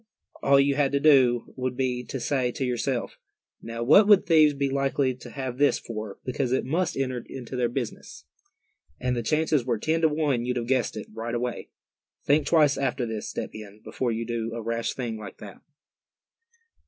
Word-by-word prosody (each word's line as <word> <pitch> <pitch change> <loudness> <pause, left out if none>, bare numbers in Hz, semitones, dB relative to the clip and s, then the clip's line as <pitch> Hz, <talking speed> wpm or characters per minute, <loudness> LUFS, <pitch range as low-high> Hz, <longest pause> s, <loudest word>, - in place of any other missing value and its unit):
All 140 0 +5
you 140 0 +3
had 140 -1 +1
to 140 - +3
do 130 -5 +4
would 130 -1 -3
be 125 -2 -1
to 135 - -5
say 125 0 0
to 135 - -2
yourself, 125 0 -2 0.4
'now, 115 0 -5
what 195 - +6
would 205 -3 +6
thieves 155 -3 +5
be 140 0 0
likely 135 -1 0
to - - -11
have 130 -2 -5
this 145 - +4
for, 110 -3 -7
because 125 -1 -2
it 130 - +1
must 170 +6 -1
enter 130 -3 -2
into 130 -1 -7
their 125 -2 +1
business?' 120 -2 -6 0.7
and 125 0 -1
the 120 - -1
chances 155 +1 +1
were 120 -2 -1
ten 160 +8 0
to 160 - +4
one 150 -5 0
you'd 125 0 -2
have 120 - -2
guessed 125 -3 0
it, 105 - -5
right 115 +2 -4
away. 120 0 -3 0.6
Think 145 0 +3
twice 150 -3 +4
after 135 -2 -1
this, 110 -2 -5
Step - - -5
Hen, 105 -1 -10
before 125 -2 -2
you 115 +1 -3
do 115 0 -3
a 115 - -4
rash 115 +1 -2
thing 120 -4 -4
like 100 -3 -9
that." 100 -2 -11
125 Hz, 195 wpm, -26 LUFS, 115-140 Hz, 0.7 s, what